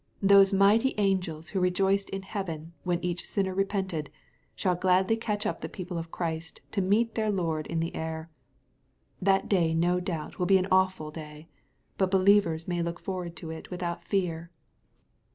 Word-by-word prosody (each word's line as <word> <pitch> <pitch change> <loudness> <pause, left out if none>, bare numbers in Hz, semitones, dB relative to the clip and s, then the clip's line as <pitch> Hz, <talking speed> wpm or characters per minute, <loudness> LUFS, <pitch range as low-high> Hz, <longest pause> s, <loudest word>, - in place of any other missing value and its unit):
Those 195 0 +7
mighty 205 +6 +4
angels 180 -6 0
who 195 - -1
rejoiced 190 +2 +2
in 195 0 -5
heaven 170 -5 -5
when 175 -1 -1
each 175 0 -2
sinner 190 -2 -1
repented, 190 -5 -1 0.5
shall 185 - +1
gladly 185 +4 +3
catch 215 -2 -2
up 215 - -2
the - - -4
people 180 -3 -5
of 165 0 -6
Christ 165 -1 -4
to 200 - 0
meet 215 +5 +2
their 220 -1 0
Lord 165 -6 -1
in 165 -1 -1
the 165 - -3
air. 160 0 -4 0.9
That 195 0 +3
day 170 -5 +2
no 175 +2 +2
doubt 175 -4 -5
will 180 - +1
be 195 - +6
an 185 0 0
awful 185 -5 +2
day, 155 0 -10 0.5
but 190 -1 +3
believers 185 -4 +3
may 175 -1 -1
look 170 0 -3
forward 180 -3 -5
to 160 -1 -7
it 160 - -8
without 175 -1 -4
fear. 170 -4 -1
180 Hz, 170 wpm, -28 LUFS, 165-195 Hz, 0.9 s, Those